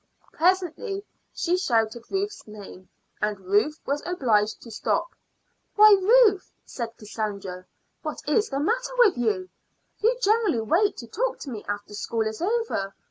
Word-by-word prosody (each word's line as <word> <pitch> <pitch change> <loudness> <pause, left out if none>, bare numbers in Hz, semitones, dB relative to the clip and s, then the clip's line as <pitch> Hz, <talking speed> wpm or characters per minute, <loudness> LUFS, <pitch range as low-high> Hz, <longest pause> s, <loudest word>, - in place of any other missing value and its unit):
Presently 375 +4 0 0.3
she 350 +1 0
shouted 230 -7 0
Ruth's 400 - -3
name, 200 -3 -11 0.3
and 210 -1 -1
Ruth 205 +11 +1
was 285 +1 -1
obliged 220 -11 +1
to 230 - -11
stop. 225 - -1 0.7
"Why, 425 0 +8
Ruth," 420 -2 +4
said 230 -2 -6
Cassandra, 200 -4 -5 0.3
"what 305 -2 -4
is 415 +9 +2
the 275 - -2
matter 480 +10 -1
with 470 -6 +5
you? 205 -6 -1 0.5
You 470 +3 +2
generally 425 - +2
wait 350 - +2
to 235 - -8
talk 475 - -2
to 275 - -6
me 215 -3 -6
after 205 0 -5
school 220 +2 -2
is 220 +4 -4
over. 395 - -1
275 Hz, 145 wpm, -25 LUFS, -, 0.7 s, Why